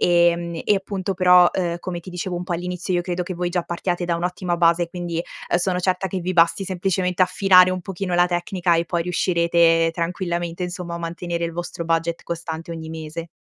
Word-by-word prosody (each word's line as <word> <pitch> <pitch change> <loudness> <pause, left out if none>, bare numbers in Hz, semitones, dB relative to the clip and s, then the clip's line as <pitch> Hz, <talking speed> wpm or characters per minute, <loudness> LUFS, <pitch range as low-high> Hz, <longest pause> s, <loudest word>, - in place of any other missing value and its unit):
Ehm, 170 -1 +3
e, 210 - +4
appunto 195 0 -3
però, 180 -1 +6
uhm, 175 -2 -1
come 180 -2 -4
ti 180 - -13
dicevo 180 +1 -4
un 175 - -3
po' 180 - -4
all'inizio, 180 +1 -3
io 175 - +2
credo 180 0 -2
che 185 - -5
voi 175 0 -2
già 175 -1 -1
partiate 175 +1 -2
da 170 - 0
un'ottima 180 0 -2
base, 170 0 +3
quindi, 170 -1 -4 0.3
uhm, - - +4
sono 180 0 0
certa 185 +1 0
che 190 -1 -3
vi 185 +2 -2
basti 170 +2 +3
semplicemente 185 0 -1
affinare 185 -1 +5
un 185 0 -2
pochino 185 0 -4
la 175 0 +4
tecnica 175 0 0
e 170 - +1
poi 170 0 -1
riuscirete 170 -1 +3
tranquillamente, 170 0 -3
insomma, 175 -1 -4
a - - -4
mantenere 170 0 -3
il 165 - -3
vostro 175 0 -5
budget 165 0 -1
costante 165 -1 -5
ogni 160 -1 -6
mese. 160 +1 -6
175 Hz, 205 wpm, -22 LUFS, 170-180 Hz, 0.3 s, però